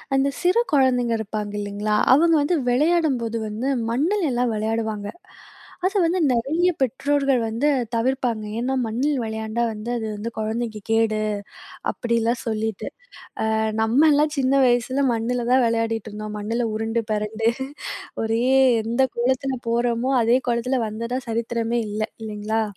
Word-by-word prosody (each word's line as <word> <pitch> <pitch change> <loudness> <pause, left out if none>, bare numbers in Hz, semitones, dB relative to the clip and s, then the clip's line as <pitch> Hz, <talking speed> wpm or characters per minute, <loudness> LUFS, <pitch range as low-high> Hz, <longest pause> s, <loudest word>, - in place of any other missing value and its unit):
அந்த 270 +1 +3
சிறு 360 +6 +3
குழந்தைங்க 250 -4 +3
இருப்பாங்க 210 -1 -4
இல்லீங்களா? 205 +1 -2 0.2
அவங்க 330 +3 +5
வந்து 340 +5 +1
வெளையாடும்போது 265 -5 +1
வந்து 220 +5 -3 0.2
மண்ணுல 320 - +1
எல்லாம் 245 -1 +1
விளையாடுவாங்க. 220 -1 -2 0.8
அத 385 - +1
வந்து 355 +3 +1
நெறைய 305 +10 +1
பெற்றோர்கள் 275 0 +1
வந்து 230 +7 0 0.3
தவிர்ப்பாங்க. 240 -2 0 0.2
ஏன்னா, 260 +2 -1
மண்ணில் 265 +5 0
விளையாண்டா 220 +1 -2
வந்து 215 +3 -7
அது 220 - -4
வந்து, 225 +3 -5
குழந்தைக்கு 220 0 -3
கேடு. 220 -1 +2 0.7
அப்டிலாம் 235 0 0
சொல்லிட்டு. 220 -2 -2 0.7
ஆ. - - +2 0.3
நம்மலாம் 295 +6 +4
சின்ன 265 0 +2
வயசுல 250 +3 +1
மண்ணுல 235 +1 -1
தான் 260 -1 +5
விளையாடிட்டு 225 -1 -1
இருந்தோம். 210 0 -6
மண்ணுல 230 +3 -1
உருண்டு 225 +1 -1
பெரண்டு. 215 +2 0 0.8
ஒரே 225 +2 0 0.4
எந்த 235 +4 0
கோலத்துல 260 +2 0
போறோமோ, 240 +2 +1
அதே 235 +3 +4
கோலத்துல 240 +2 0
வந்ததா 230 +4 -3
சரித்திரமே 230 +1 -1
இல்ல. 215 +1 -3 0.2
இல்லீங்களா? 220 +1 -2
235 Hz, 130 wpm, -23 LUFS, 220-260 Hz, 0.8 s, அவங்க